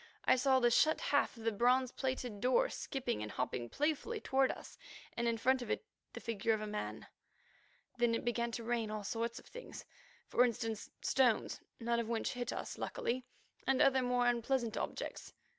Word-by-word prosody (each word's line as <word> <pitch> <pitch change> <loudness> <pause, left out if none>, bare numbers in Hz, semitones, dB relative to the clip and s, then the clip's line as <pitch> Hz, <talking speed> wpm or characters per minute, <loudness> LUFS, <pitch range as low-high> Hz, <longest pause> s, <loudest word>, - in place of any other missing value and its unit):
I - - +6
saw 260 +1 +4
the 240 -1 +4
shut 310 +6 +4
half 285 -3 +1
of 225 - -10
the 225 - +2
bronze 250 +4 +3
plated 255 -6 -3
door - - +3
skipping 255 - -3
and 105 0 -4
hopping 125 -1 -2
playfully 315 - -1
toward 265 -7 +2
us, - - -10 0.4
and 235 0 0
in 230 -1 +1
front 260 +3 +3
of 240 - -6
it - - -1 0.3
the - - -6
figure 225 0 0
of - - -4
a - - -2
man. 210 0 -4 0.9
Then 235 -1 +3
it - - -3
began 235 0 0
to 235 - -3
rain 230 -1 0
all 215 -1 -4
sorts 230 +3 -2
of - - -10
things. - - -9 0.4
For 245 - +4
instance, 225 -2 -1
stones, 250 -5 +2 0.2
none 235 0 +1
of 230 -1 -2
which 230 -1 -1
hit 245 -1 -3
us, - - -5
luckily, 250 +1 -2 0.4
and 265 0 +3
other 265 -1 +5
more 245 -1 +2
unpleasant 240 0 +1
objects. - - -4
240 Hz, 190 wpm, -35 LUFS, 225-260 Hz, 0.9 s, I